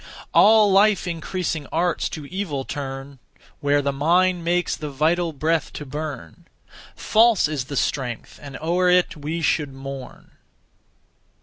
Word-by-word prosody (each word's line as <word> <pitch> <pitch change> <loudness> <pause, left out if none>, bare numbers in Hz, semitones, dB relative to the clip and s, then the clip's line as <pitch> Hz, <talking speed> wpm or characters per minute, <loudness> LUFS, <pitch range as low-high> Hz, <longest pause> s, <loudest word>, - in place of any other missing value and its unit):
All 215 -1 +6
life 200 0 +4
increasing 170 -3 -3
arts 175 +1 0
to 150 - -7
evil 155 -6 -4
turn; 135 -1 -6 0.4
Where 145 0 +1
the 140 - 0
mind 175 +5 +2
makes 175 +1 0
the 150 - -6
vital 165 +5 +1
breath 160 +2 -1
to 150 - -7
burn, 145 - -7 0.5
(False) 225 -5 +3
is 150 -4 -3
the 140 +1 -5
strength, 125 -5 -3
(and 140 -1 -8
o'er 175 +3 +1
it 180 0 +3
we 155 +3 -4
should 145 -1 +1
mourn.) 135 -1 -9
155 Hz, 135 wpm, -22 LUFS, 140-180 Hz, 0.5 s, All